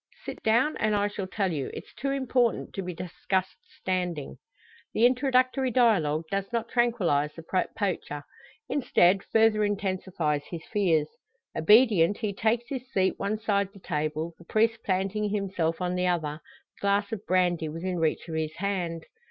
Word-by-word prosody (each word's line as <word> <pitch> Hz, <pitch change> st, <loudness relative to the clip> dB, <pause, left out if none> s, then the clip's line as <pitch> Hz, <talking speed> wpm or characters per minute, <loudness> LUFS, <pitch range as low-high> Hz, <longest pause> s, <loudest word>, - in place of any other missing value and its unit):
"Sit -, -, -6 dB
down, 235 Hz, +7 st, +3 dB
and 215 Hz, -1 st, +1 dB
I 205 Hz, 0 st, +2 dB
shall 205 Hz, -2 st, -5 dB
tell 195 Hz, -1 st, -1 dB
you. 140 Hz, -4 st, -3 dB
It's -, -, -9 dB
too 275 Hz, +3 st, -3 dB
important 260 Hz, -3 st, 0 dB
to 195 Hz, -, -3 dB
be 180 Hz, -1 st, -4 dB
discussed 185 Hz, +2 st, -2 dB, 0.2 s
standing." 180 Hz, -6 st, -2 dB, 0.6 s
The 230 Hz, -, +5 dB
introductory 255 Hz, +1 st, +3 dB
dialogue 195 Hz, -, +3 dB
does 195 Hz, +1 st, -2 dB
not 235 Hz, -1 st, -2 dB
tranquillise 180 Hz, -, +1 dB
the 165 Hz, -, -9 dB, 0.3 s
poacher; 175 Hz, -7 st, -2 dB, 0.4 s
instead, 195 Hz, -8 st, +3 dB
further 220 Hz, -1 st, +3 dB
intensifies 185 Hz, -7 st, -1 dB
his 170 Hz, -2 st, -7 dB
fears. 170 Hz, -8 st, +2 dB, 0.5 s
Obedient, 205 Hz, -1 st, +5 dB
he 215 Hz, -3 st, -2 dB
takes 230 Hz, +4 st, 0 dB
his 255 Hz, -2 st, -6 dB
seat 190 Hz, -1 st, +1 dB
one 200 Hz, +2 st, -1 dB
side 200 Hz, -2 st, 0 dB
the 200 Hz, -, -14 dB
table, 155 Hz, 0 st, -2 dB
the 170 Hz, -, -15 dB
priest 225 Hz, +4 st, +2 dB
planting 195 Hz, +2 st, 0 dB
himself 190 Hz, -5 st, -1 dB
on 180 Hz, -1 st, -1 dB
the 180 Hz, 0 st, 0 dB
other, 160 Hz, -3 st, -1 dB, 0.4 s
the -, -, -22 dB
glass 200 Hz, +1 st, +1 dB
of 215 Hz, -3 st, -4 dB
brandy 175 Hz, -3 st, +2 dB
within 175 Hz, +3 st, -3 dB
reach 160 Hz, +1 st, 0 dB
of 165 Hz, -, -6 dB
his 160 Hz, 0 st, -2 dB
hand. 175 Hz, -3 st, -2 dB
195 Hz, 160 wpm, -27 LUFS, 170-220 Hz, 0.6 s, The